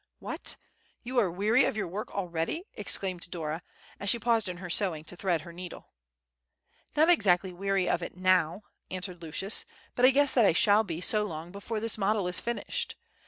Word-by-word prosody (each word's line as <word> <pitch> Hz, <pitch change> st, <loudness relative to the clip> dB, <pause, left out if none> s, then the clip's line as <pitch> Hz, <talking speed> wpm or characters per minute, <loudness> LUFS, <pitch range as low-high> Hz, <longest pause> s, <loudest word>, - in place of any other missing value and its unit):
"What, -, -, -5 dB, 0.5 s
you 250 Hz, +1 st, 0 dB
are 205 Hz, -6 st, +2 dB
weary 210 Hz, +8 st, +3 dB
of -, -, -1 dB
your 210 Hz, -, -1 dB
work 200 Hz, +5 st, -5 dB
already!" 180 Hz, -, -2 dB
exclaimed 185 Hz, -3 st, -1 dB
Dora, 160 Hz, -1 st, -4 dB, 0.4 s
as 200 Hz, -, +1 dB
she 235 Hz, -, +6 dB
paused 230 Hz, -3 st, +1 dB
in 180 Hz, -, -5 dB
her 180 Hz, 0 st, -7 dB
sewing 170 Hz, -3 st, 0 dB
to 170 Hz, -, -4 dB
thread 175 Hz, -3 st, 0 dB
her 170 Hz, +1 st, -11 dB
needle. 180 Hz, +1 st, -9 dB, 1.0 s
"Not 315 Hz, +2 st, +5 dB
exactly 190 Hz, -, +3 dB
weary 195 Hz, 0 st, 0 dB
of 175 Hz, -, +1 dB
it 170 Hz, -, -7 dB
now," 185 Hz, 0 st, +2 dB, 0.3 s
answered 185 Hz, -1 st, -5 dB
Lucius, 170 Hz, +5 st, -1 dB, 0.3 s
"but 245 Hz, -, -2 dB
I 255 Hz, -, +9 dB
guess 280 Hz, +1 st, +4 dB
that 240 Hz, -, +5 dB
I 195 Hz, -, +5 dB
shall 210 Hz, +4 st, +5 dB
be 170 Hz, -5 st, -5 dB
so 210 Hz, +3 st, +3 dB
long 165 Hz, -2 st, -6 dB
before 205 Hz, +3 st, -4 dB
this 225 Hz, 0 st, +1 dB
model 200 Hz, -1 st, +1 dB
is 180 Hz, -, +1 dB
finished. 235 Hz, 0 st, -3 dB
190 Hz, 190 wpm, -29 LUFS, 175-215 Hz, 1.0 s, I